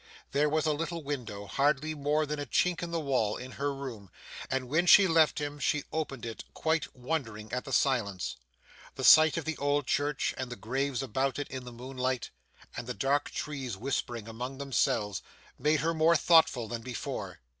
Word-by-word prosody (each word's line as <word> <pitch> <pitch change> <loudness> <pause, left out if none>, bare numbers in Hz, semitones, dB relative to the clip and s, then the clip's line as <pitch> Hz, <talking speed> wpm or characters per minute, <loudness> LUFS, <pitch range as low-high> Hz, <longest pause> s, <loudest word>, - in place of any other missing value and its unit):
There 145 +2 +2
was 155 +1 +1
a 155 - +2
little 165 +2 -3
window, 120 -8 -5
hardly 145 - +1
more 150 +1 +1
than 150 0 -4
a 145 - -4
chink 180 -2 +1
in 170 - -3
the 170 0 -1
wall, 130 -8 0
in 130 +1 -8
her 140 +2 -2
room, 130 -8 -7 0.4
and 130 -1 -1
when 160 +7 +1
she 195 +1 +8
left 165 -2 +4
him, 145 0 -4
she 145 +2 +1
opened 140 -6 -3
it, 115 -1 -6
quite 160 0 -1
wondering 125 -5 -4
at 125 +2 -2
the 135 - -7
silence. 115 -9 +1 0.6
The - - -5
sight 155 +1 +8
of 165 - -3
the 160 -1 -2
old 145 0 +1
church, 145 +2 0
and 130 -1 -3
the - - -4
graves 135 +3 -2
about 130 +2 -1
it 145 - -4
in 130 -1 -6
the 125 - -8
moonlight, 130 +1 -3 0.4
and 120 - -5
the 125 - -4
dark 140 +2 +1
trees 135 -8 -4
whispering 120 -1 -3
among 125 +4 -6
themselves, 115 -7 0 0.4
made 150 +1 +2
her 165 +2 +1
more 160 +1 +4
thoughtful 160 -7 +4
than 115 +1 -4
before. 125 0 -5
140 Hz, 190 wpm, -30 LUFS, 125-150 Hz, 0.6 s, she